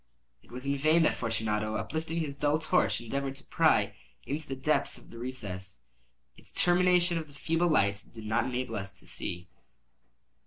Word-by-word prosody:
It - - -23
was 125 +2 -6
in 140 0 0
vain 155 +3 +5
that - - +4
Fortunato, 110 -2 -1
uplifting 160 +6 -2
his 145 -3 -3
dull 145 +1 +2
torch, 105 -9 +2
endeavored 135 +3 -3
to 135 - -14
pry - - +3 0.3
into 150 +2 -3
the 135 - -3
depths 140 +1 +1
of - - -13
the 115 - -9
recess. 100 -7 -6 0.5
Its - - -12
termination 175 -1 +3
the 155 -3 -9
feeble 165 +4 +1
light 100 - +2
did 110 -2 -9
not 110 +1 +1
enable 125 0 -2
us 100 -1 -6
to - - -17
see. 90 +1 -4
135 Hz, 170 wpm, -30 LUFS, 110-155 Hz, 0.5 s, vain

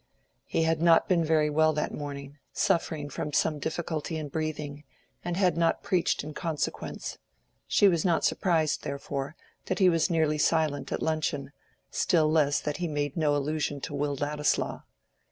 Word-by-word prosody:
He 165 - 0
had 160 0 +1
not 165 -1 +5
been 175 -3 +3
very 155 -1 +2
well 155 +1 +3
that 150 - -2
morning, 145 -1 -7
suffering 165 -6 0
from 145 +1 -5
some 155 0 +1
difficulty 160 +1 -3
in 150 -2 -5
breathing, 150 -1 -4 0.4
and 175 0 -2
had 180 -4 +3
not 165 0 +1
preached 185 -7 +1
in 150 +1 -7
consequence; 160 -2 -4 0.5
she 205 - +5
was 170 -4 +2
not 170 -4 +2
surprised, 160 -5 +1
therefore, 140 +1 -4 0.3
that 185 - -1
he 185 -1 +5
was 165 +1 +2
nearly 155 -3 +1
silent 155 -2 +1
at - - -2
luncheon, 150 -3 -1 0.4
still 155 -3 +2
less 145 -3 +3
that 150 -1 -3
he 175 - -2
made 145 -2 -2
no 150 -3 +2
allusion 145 0 -1
to - - -5
Will 145 0 -1
Ladislaw. 145 +1 -1
155 Hz, 165 wpm, -28 LUFS, 145-165 Hz, 0.5 s, not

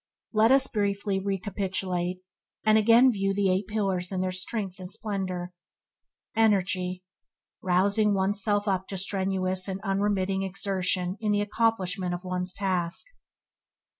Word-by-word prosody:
Let 220 +2 +4
us 270 0 +5
briefly 200 -3 0
recapitulate, 190 -2 -2 0.4
and 215 0 +5
again 230 +4 +6
view 195 -2 -1
the 195 -2 +2
Eight 190 +1 0
Pillars 195 -4 -1
in 190 - -2
their 185 0 -1
strength 190 0 -4
and 180 -1 -7
splendour. 185 -4 -3 0.8
Energy 185 -4 +1 0.3
– - - -65
Rousing 200 +3 +2
one's 195 +1 0
self 205 +1 0
up 190 -1 0
to 195 - -5
strenuous 190 -1 0
and 190 0 -3
unremitting 195 -1 0
exertion 190 -1 -1
in 215 -2 0
the 205 0 +2
accomplishment 200 -4 0
of 175 - -8
one's 180 0 -2
task. 185 - 0
195 Hz, 135 wpm, -27 LUFS, 185-205 Hz, 0.8 s, again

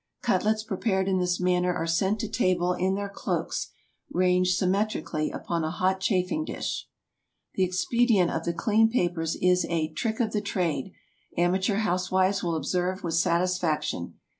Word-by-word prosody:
Cutlets 215 0 +1
prepared 195 -2 -1
in 190 -1 +2
this 180 0 0
manner 180 0 +2
are 165 - -2
sent 190 +6 +1
to 220 - -2
table 185 -5 +1
in 190 +2 0
their 200 0 -3
cloaks, 200 - -3 0.4
ranged 180 0 +2
symmetrically 185 -5 0
upon 170 -2 -3
a 155 - -1
hot 185 +2 0
chafing 190 +9 0
dish. - - -4 0.7
The 190 - +1
expedient 190 +1 +2
of 160 - -3
the 170 - 0
clean 220 +5 +3
papers 175 -8 0
is 180 0 +3
a 160 -2 0
"trick 220 +6 -2
of 225 -3 +1
the 210 - -1
trade," 180 -6 -2 0.5
amateur 190 +4 +2
housewives 185 -1 +1
will 170 -2 0
observe 180 +5 -1
with 170 -2 -2
satisfaction. 170 - 0
185 Hz, 155 wpm, -27 LUFS, 175-200 Hz, 0.7 s, clean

